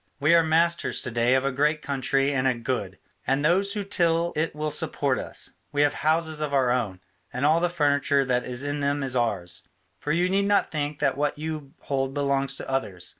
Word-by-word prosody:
We 150 +4 +4
are 170 - +7
masters 165 +2 +1
to 130 - -4
day 120 +2 +2
of 130 +1 +1
a 140 - +1
great 150 +3 0
country 135 0 0
and 130 -1 +1
a 130 - +2
good; 115 -6 -3 0.3
and 135 +3 +1
those 195 +5 +2
who 205 -2 -3
till 170 -3 +1
it 155 0 -1
will 150 0 -2
support 140 -2 +1
us; - - -3 0.2
we 145 0 +2
have 145 - +2
houses 160 0 0
of 145 -2 -1
our 130 -3 +3
own, 105 -7 -2 0.3
and 125 +3 -2
all 155 +3 +4
the 175 +1 +1
furniture 145 -4 +2
that 125 -1 0
is 125 +1 0
in 145 0 -2
them 140 0 0
is 130 -1 +3
ours. 100 -8 -1 0.4
For 150 - -3
you 175 +3 +2
need 195 +2 +1
not 205 0 +2
think 150 -1 -3
that 140 -2 +1
what 145 0 -1
you 155 -2 -6
hold 135 -1 -2
belongs 140 -1 0
to - - -7
others. 100 -10 -2
145 Hz, 220 wpm, -25 LUFS, 130-155 Hz, 0.4 s, are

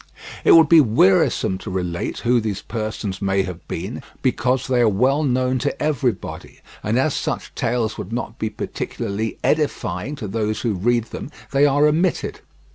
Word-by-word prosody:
It - - +6
would 165 -2 +8
be 165 +1 +8
wearisome 95 -5 +3
to - - -7
relate 90 -2 -3
who 120 0 +3
these 105 -3 -3
persons 110 -4 -4
may 95 0 +1
have 90 -2 -8
been - - -5 0.2
because 125 +1 +1
they 125 -2 +2
are 115 - +5
well 130 +9 +2
known 130 -2 +1
to 145 - -2
everybody, 130 -8 -2 0.2
and, - - 0
as - - +2
such - - -3
tales 115 -2 -1
would - - -6
not 120 -1 -4
be 110 - -1
particularly 110 0 -4
edifying 135 - -1
to 110 - -6
those 110 +1 -2
who 115 -3 0
read 115 +5 +1
them, - - -6 0.2
they 140 +1 +4
are 145 +1 +3
omitted. 165 +4 +1
115 Hz, 170 wpm, -21 LUFS, 105-135 Hz, 0.2 s, would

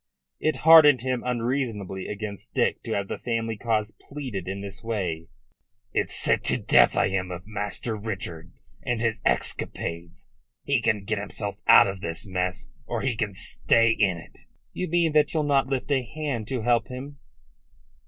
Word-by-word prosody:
It 155 -2 +1
hardened 155 -5 +8
him 130 -1 -1
unreasonably 115 -6 -2
against 105 -1 -6
Dick - - +1
to - - -2
have 100 -1 -1
the - - -5
family 115 -2 -2
cause 110 -1 -1 0.2
pleaded 130 -11 -5
in 100 +1 -4
this 100 0 -7
way. 90 -8 -3 0.7
"It's - - -1
sick - - +2
to - - +1
death - - +4
I - - +4
am 95 -1 -2
of 90 0 -7
Master 105 +2 -4
Richard 95 -6 -6 0.3
and 120 -2 -2
his 110 -2 -1
escapades. 85 +1 -2 0.4
He 140 -4 +1
can 110 -3 +1
get 105 +1 -2
himself 100 0 -5
out - - +9
of 95 -2 -4
this 85 +3 -4
mess, 90 -1 -3 0.2
or - - -3
he 130 -3 0
can 105 -2 -2
stay 115 +4 +2
in 95 -5 +2
it." 85 - -14 0.3
"You 180 - -3
mean 170 -1 +2
that 150 +1 +3
you'll 155 - +2
not 140 -3 +2
lift 135 +1 -2
a 135 -2 +3
hand 125 -3 -4
to 125 -3 -3
help 120 0 +2
him." 140 +2 -8
110 Hz, 175 wpm, -26 LUFS, 100-130 Hz, 0.7 s, out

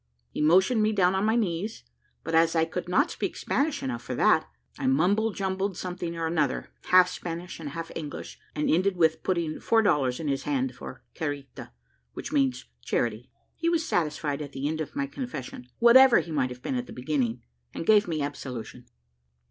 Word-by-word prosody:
He - - -3
motioned 190 +9 +4
me 215 +1 +2
down 185 -3 +3
on 190 +2 +1
my 220 +1 +2
knees; 205 -1 -2 0.4
but 165 - -4
as 165 +1 +4
I 160 0 +3
could 175 +2 -5
not 280 - +2
speak - - -3
Spanish 290 0 -1
enough 120 -2 -3
for - - -5
that, - - +3 0.3
I - - -1
mumble 185 +11 +3
jumbled 190 -1 -2
something 175 -2 -4
or 165 - -1
another, 155 -5 -1
half 185 0 +6
Spanish 175 -1 -6
and 155 -3 -5
half 165 +2 -6
English, 150 -3 -7 0.2
and 150 - 0
ended 185 +3 +2
with 160 -2 +3
putting 170 -4 -1
four 225 -1 +3
dollars 135 -10 +2
in 160 - -4
his 135 -1 0
hand 135 -3 -1
for 125 0 -10
carita, 145 -3 -5 0.4
which - - -6
means 135 -3 +1 0.2
charity. 115 - -2 0.3
He 335 - 0
was 330 -2 +1
satisfied 150 -3 -1
at 145 -2 -7
the 135 +2 -2
end 160 +1 -2
of 155 - -6
my 285 -1 0
confession, 270 -1 -7
whatever 245 +2 +8
he 170 - -2
might 140 -4 +1
have 125 +1 -10
been - - -2
at 250 -1 -2
the - - -9
beginning, 125 -3 -1 0.3
and - - -6
gave 210 -1 +5
me 155 -4 -1
absolution. 130 -5 -6
165 Hz, 195 wpm, -27 LUFS, 145-200 Hz, 0.4 s, whatever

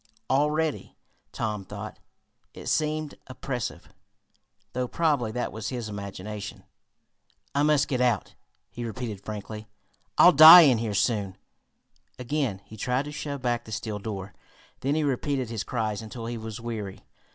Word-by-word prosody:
Already, 150 +3 0 0.4
Tom 105 -2 -3
thought, - - -8 0.6
it - - -9
seemed 155 -1 0
oppressive, 125 - -5 0.8
though 125 0 -1
probably 145 -7 +1
that 125 +2 -2
was 110 -1 -5
his 120 -4 -4
imagination. 100 0 -7 0.9
"I 140 - +2
must 150 -1 +3
get 130 -2 -1
out!" 120 -6 +1 0.4
he 120 - -6
repeated 115 -4 -5
frantically. 105 0 -7 0.5
"I'll - - +9
die 160 +4 +12
in 130 -8 +5
here 110 -3 -2
soon." 100 -4 0 0.8
Again 125 -6 -2
he 110 - -12
tried 125 +5 0
to 150 - -6
shove 140 -2 -5
back 120 -1 0
the 110 - -10
steel 105 -1 -4
door. 100 -2 -6 0.5
Then 140 +3 0
he 155 - +1
repeated 135 -2 -1
his 110 -4 -2
cries 110 -1 -2
until 115 +1 -7
he 120 +1 -4
was 110 -1 -6
weary. 110 -5 -6
120 Hz, 145 wpm, -27 LUFS, 105-140 Hz, 0.9 s, die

